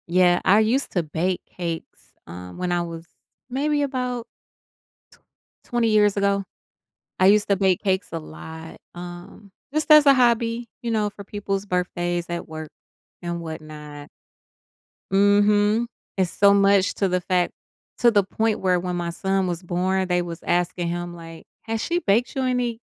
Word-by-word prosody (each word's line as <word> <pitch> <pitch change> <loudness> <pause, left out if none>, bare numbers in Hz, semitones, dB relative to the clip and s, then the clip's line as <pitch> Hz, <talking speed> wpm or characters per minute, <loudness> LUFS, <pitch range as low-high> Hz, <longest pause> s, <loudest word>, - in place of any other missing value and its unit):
Yeah, 175 0 +4
I 205 +3 +5
used 235 +6 +1
to 175 - +1
bake 170 +4 -2
cakes, 170 -2 -7
um, 90 +1 -9
when 180 0 -2
I 175 0 +1
was 165 -1 -6 0.4
maybe 290 +3 0
about 250 -3 -2 1.4
t - - -23
20 240 -1 +2
years 210 -2 +3
ago, 200 0 +1 0.7
I 185 - +4
used 205 +1 +4
to 200 - +3
bake 190 -2 +2
cakes 190 -1 0
a 165 - -2
lot, 160 +1 -10 0.2
um, 175 +3 -10 0.2
just 310 +1 -1
as 305 -1 +8
a 275 - +8
hobby, 235 -1 +2
you 235 - -2
know, 215 -2 +1
for 200 0 -11
people's 200 -1 -3
birthdays 175 -2 -1
at 170 0 -4
work 155 -1 -7 0.5
and 170 0 -3
whatnot. 150 -2 -9 1.0
Mhm. 205 +3 +3 0.3
It's 185 -2 +1
so 200 0 +5
much 200 -1 +4
to 195 - +1
the 180 0 +1
fact 180 0 +1 0.5
to 240 -1 +5
the 205 -2 +4
point 220 +3 -1
where 180 -1 +2
when 180 0 -3
my 175 -1 -2
son 190 +2 0
was 175 -1 -3
born, 185 +1 0
they 180 0 +1
was 170 -1 -6
asking 175 0 0
him 175 0 -4
like, 165 -1 -11 0.2
"Has 225 -1 -3
she 345 +1 0
baked 230 - +1
you 265 - 0
any 250 -3 -1
190 Hz, 165 wpm, -23 LUFS, 175-215 Hz, 1.4 s, as